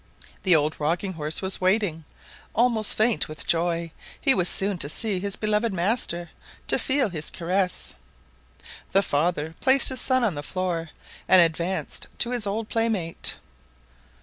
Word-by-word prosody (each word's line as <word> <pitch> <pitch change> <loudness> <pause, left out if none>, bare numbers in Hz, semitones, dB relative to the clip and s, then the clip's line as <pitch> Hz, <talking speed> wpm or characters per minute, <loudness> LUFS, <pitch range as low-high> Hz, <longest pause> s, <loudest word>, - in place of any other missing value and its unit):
The 185 -3 +4
old 155 0 +1
rocking 170 +6 -1
horse 155 +2 -3
was 190 0 -1
waiting, 185 -4 +1 0.5
almost 225 -2 +2
faint 220 +1 +1
with 155 - -7
joy; 170 0 0 0.3
he 275 - +5
was 180 -5 +3
soon 195 -2 0
to 145 - 0
see 205 +3 -1
his 200 +1 -3
beloved 215 +1 0
master, 175 -3 -1 0.4
to - - +3
feel 265 -5 +1
his 155 -4 -5
caress. 180 +1 -1 1.0
The 195 - +4
father 160 0 -1
placed 265 +1 +7
his 260 -1 0
son 255 -1 +2
on 215 -6 +1
the 145 - -5
floor, 170 0 -3 0.4
and 185 - +7
advanced 170 +2 0
to 240 - +2
his 240 -4 0
old 215 +2 -3
playmate. 220 -8 -1
185 Hz, 150 wpm, -24 LUFS, 165-220 Hz, 1.0 s, placed